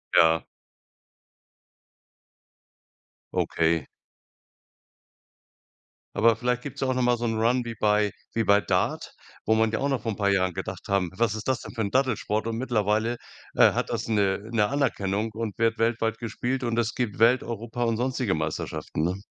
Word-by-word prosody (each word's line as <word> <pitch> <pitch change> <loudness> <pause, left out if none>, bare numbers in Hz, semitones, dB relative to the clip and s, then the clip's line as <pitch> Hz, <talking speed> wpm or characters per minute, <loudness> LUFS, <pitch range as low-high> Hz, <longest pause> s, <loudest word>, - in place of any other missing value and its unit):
Ja. 80 0 +5 2.9
Okay. 80 -3 +1 2.3
Aber 115 +1 +4
vielleicht 125 +1 -1
gibt's 140 - -7
ja 135 - +1
auch 130 - +1
noch 130 - 0
mal 120 0 +3
so 120 - -2
'nen 110 -1 -1
Run 120 +3 +2
wie 115 - -5
bei 105 -1 +2 0.2
wie 115 - +1
bei 100 -1 +4
Dart, - - -1 0.3
wo 110 - +3
man 110 0 +2
ja 110 - 0
auch 140 - 0
noch 135 -2 0
vor 115 - -2
'n - - -8
paar 100 -1 +1
Jahren 95 -2 +1
gedacht - - -6
haben: 100 -3 0
„Was 110 0 +1
ist 110 - -6
das 130 -2 0
denn - - -9
für 115 - -2
'n 100 -2 -1
Dattelsport?“ 130 -5 0
Und 115 0 -2
mittlerweile, 115 -1 0 0.4
äh, - - +5
hat - - -2
das - - -2
'ne 100 -3 +1
'ne 105 -3 +2
Anerkennung 110 -6 -1
und 110 -1 -5
wird 115 0 +2
weltweit 115 0 0
gespielt 125 +3 -3
und 115 -1 0
es 115 -1 -1
gibt 120 -5 -2
Welt, 120 +3 +5
Europa 115 +1 -4
und 115 -2 +1
sonstige 125 -4 0
Meisterschaften, 75 0 -3
ne? 90 +4 -1
115 Hz, 175 wpm, -26 LUFS, 105-120 Hz, 2.9 s, Ja